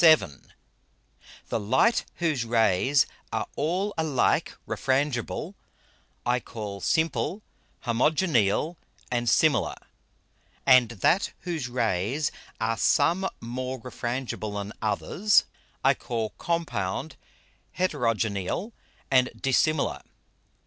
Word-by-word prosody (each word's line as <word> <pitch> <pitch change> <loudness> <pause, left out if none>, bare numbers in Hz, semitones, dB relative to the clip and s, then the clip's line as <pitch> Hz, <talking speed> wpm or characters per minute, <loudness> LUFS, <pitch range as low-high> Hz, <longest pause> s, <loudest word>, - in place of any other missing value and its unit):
VII 160 -2 +9 1.4
_The - - +1
Light 130 - +3
whose 155 -8 0
Rays 115 +3 +3 0.3
are - - -1
all 185 +7 0
alike 150 -5 +1
Refrangible, 135 -3 -1 0.7
I 125 +1 +2
call 105 -4 -7
Simple, 165 +4 0 0.4
Homogeneal 135 - +2 0.3
and 120 -1 +1
Similar; 155 -3 +3 0.9
and 130 -4 +6
that 120 - +1
whose 165 -8 -3
Rays 120 - 0 0.3
are 115 0 0
some 190 +3 +3
more 130 +2 -4
Refrangible 120 -3 -4
than 100 +1 -5
others, 165 - +2 0.4
I - - +6
call 115 -3 -3
Compound, 160 - -2 0.6
Heterogeneal 115 - -1 0.4
and 130 -1 +5
Dissimilar. 145 +3 +1
130 Hz, 90 wpm, -27 LUFS, 115-160 Hz, 1.4 s, VII